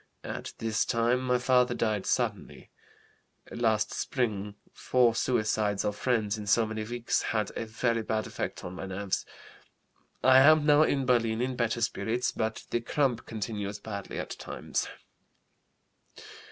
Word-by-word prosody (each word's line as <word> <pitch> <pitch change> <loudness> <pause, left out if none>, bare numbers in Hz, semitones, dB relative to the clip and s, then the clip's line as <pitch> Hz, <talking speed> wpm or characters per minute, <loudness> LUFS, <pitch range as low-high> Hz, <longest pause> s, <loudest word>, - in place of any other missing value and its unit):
At - - -6
this 110 -2 0
time 120 +2 +1
my 125 -1 +2
father 125 0 +3
died 110 -4 -1
suddenly. - - -2 0.8
Last 110 -2 +1
spring 105 -6 -2 0.2
four 125 -2 +2
suicides 110 -4 0
of 105 - -1
friends 110 -3 0
in 105 - -7
so 110 +2 +4
many 110 0 -4
weeks 120 +2 -1
had 105 -2 -1
a 115 - -4
very 115 +1 0
bad 110 0 -1
effect - - -5
on 90 - -6
my 95 - -6
nerves. 95 0 -3 1.0
I 130 0 +7
am 155 +2 +6
now 150 0 +6
in 140 -3 +2
Berlin 115 -3 +2
in 130 +1 -1
better 120 -1 -1
spirits, 115 +1 0
but 110 0 -3
the 120 - 0
cramp 125 -1 0
continues 105 -2 -4
badly 100 -1 -6
at - - -4
times. - - -4
115 Hz, 145 wpm, -29 LUFS, 105-125 Hz, 1.0 s, I